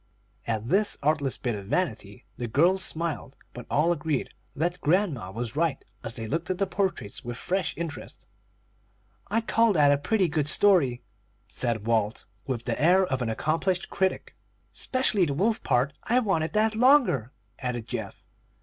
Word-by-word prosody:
At 110 Hz, -1 st, -2 dB
this 205 Hz, -, +2 dB
artless 145 Hz, -3 st, +1 dB
bit 120 Hz, -, -2 dB
of 100 Hz, -2 st, -7 dB
vanity, 125 Hz, -, -2 dB
the 120 Hz, -, -4 dB
girls 175 Hz, +11 st, +3 dB
smiled, 160 Hz, -6 st, -2 dB, 0.2 s
but 120 Hz, -, -9 dB
all 160 Hz, +4 st, +2 dB
agreed 150 Hz, -4 st, -2 dB, 0.2 s
that 175 Hz, +4 st, -2 dB
grandma 155 Hz, -, +1 dB
was 115 Hz, +5 st, -5 dB
right, 165 Hz, -1 st, -1 dB, 0.2 s
as 115 Hz, -1 st, -4 dB
they 115 Hz, -, -5 dB
looked 165 Hz, +10 st, -3 dB
at 185 Hz, -, -1 dB
the 195 Hz, -, +1 dB
portraits 185 Hz, -, -3 dB
with 120 Hz, 0 st, -6 dB
fresh 185 Hz, +3 st, -2 dB
interest. 165 Hz, -3 st, -7 dB, 1.0 s
"I 225 Hz, +3 st, +1 dB
call 230 Hz, -1 st, +2 dB
that 145 Hz, -4 st, +5 dB
a 140 Hz, -, +2 dB
pretty 190 Hz, +5 st, +1 dB
good 150 Hz, -2 st, -1 dB
story," 150 Hz, -10 st, +4 dB, 0.4 s
said 115 Hz, -4 st, -2 dB
Walt, 110 Hz, -1 st, 0 dB, 0.2 s
with 120 Hz, -3 st, -3 dB
the 120 Hz, +1 st, -2 dB
air 185 Hz, +4 st, +5 dB
of 130 Hz, -7 st, -2 dB
an 120 Hz, -, -1 dB
accomplished 165 Hz, -, -1 dB
critic. 190 Hz, -1 st, -1 dB, 0.4 s
"'Specially 250 Hz, -8 st, +2 dB
the 140 Hz, -3 st, -2 dB
wolf 215 Hz, -, +1 dB
part. 130 Hz, +2 st, +1 dB
I 240 Hz, -, +2 dB
wanted 165 Hz, -9 st, 0 dB
that 220 Hz, +1 st, +2 dB
longer," 230 Hz, -, +4 dB, 0.3 s
added 125 Hz, -3 st, -3 dB
Geoff. -, -, -6 dB
155 Hz, 165 wpm, -26 LUFS, 120-190 Hz, 1.0 s, that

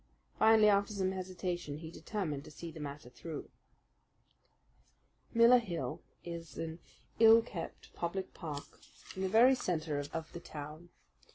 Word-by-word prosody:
Finally, 220 Hz, -1 st, +7 dB
after 200 Hz, +1 st, +4 dB
some 190 Hz, -2 st, 0 dB
hesitation, 180 Hz, -5 st, -3 dB
he 160 Hz, +1 st, -8 dB
determined 170 Hz, -8 st, -3 dB
to -, -, -11 dB
see 165 Hz, +2 st, -8 dB
the 160 Hz, -, -10 dB
matter 145 Hz, -3 st, -6 dB
through. 150 Hz, +5 st, -7 dB, 1.8 s
Miller 235 Hz, +1 st, +7 dB
Hill 175 Hz, -8 st, -4 dB, 0.2 s
is 170 Hz, -1 st, -7 dB
an 165 Hz, +1 st, -4 dB, 0.4 s
ill 225 Hz, 0 st, +8 dB
kept 170 Hz, -7 st, -7 dB
public 185 Hz, +2 st, -3 dB
park 150 Hz, -4 st, -5 dB, 0.5 s
in 190 Hz, -, -4 dB
the 190 Hz, -, 0 dB
very 235 Hz, +6 st, +7 dB
centre 155 Hz, -, -1 dB
of 160 Hz, -1 st, -5 dB
the 170 Hz, -, -5 dB
town. 155 Hz, +2 st, -8 dB
175 Hz, 140 wpm, -34 LUFS, 155-200 Hz, 1.8 s, ill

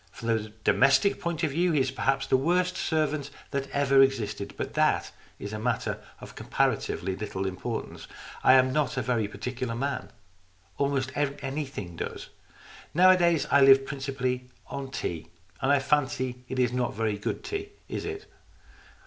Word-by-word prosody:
From 115 Hz, -, -6 dB
the 110 Hz, -2 st, 0 dB
domestic 140 Hz, +9 st, +4 dB
point 170 Hz, -1 st, -2 dB
of 155 Hz, -, +1 dB
view 170 Hz, +4 st, +1 dB
he 150 Hz, -, +3 dB
is 130 Hz, -1 st, +1 dB
perhaps 135 Hz, 0 st, 0 dB
the 135 Hz, -, +2 dB
worst 180 Hz, +6 st, +2 dB
servant 155 Hz, -2 st, 0 dB, 0.2 s
that 140 Hz, 0 st, -2 dB
ever 140 Hz, -1 st, +4 dB
existed, 115 Hz, -7 st, 0 dB
but -, -, -4 dB
that -, -, +2 dB, 0.3 s
is 100 Hz, +1 st, -7 dB
a 110 Hz, -, -3 dB
matter 115 Hz, -2 st, -1 dB, 0.2 s
of -, -, -10 dB
comparatively 95 Hz, -, -1 dB
little 95 Hz, -2 st, -4 dB
importance. 95 Hz, +5 st, -5 dB, 0.4 s
I -, -, +7 dB
am 130 Hz, 0 st, +5 dB
not 150 Hz, -3 st, 0 dB
a 125 Hz, -, 0 dB
very 115 Hz, -3 st, 0 dB
particular 125 Hz, +2 st, -4 dB
man. 135 Hz, +2 st, -3 dB, 0.7 s
Almost 140 Hz, -2 st, 0 dB
anything 140 Hz, -, -3 dB
does. -, -, -5 dB, 0.7 s
Nowa 185 Hz, +2 st, +7 dB
days 170 Hz, -3 st, +2 dB
I 140 Hz, -, +6 dB
live 135 Hz, 0 st, +7 dB
principally 130 Hz, -3 st, -3 dB, 0.2 s
on 135 Hz, -1 st, -6 dB
tea, 85 Hz, -, -4 dB, 0.3 s
and 135 Hz, -, +2 dB
I 145 Hz, -, +6 dB
fancy 130 Hz, -3 st, 0 dB
it 130 Hz, -, -4 dB
is 125 Hz, -1 st, +2 dB
not 125 Hz, -3 st, -1 dB
very 110 Hz, -2 st, -1 dB
good -, -, -3 dB
tea, 405 Hz, 0 st, -4 dB, 0.2 s
is -, -, -4 dB
it 415 Hz, 0 st, -5 dB
135 Hz, 165 wpm, -27 LUFS, 120-145 Hz, 0.7 s, I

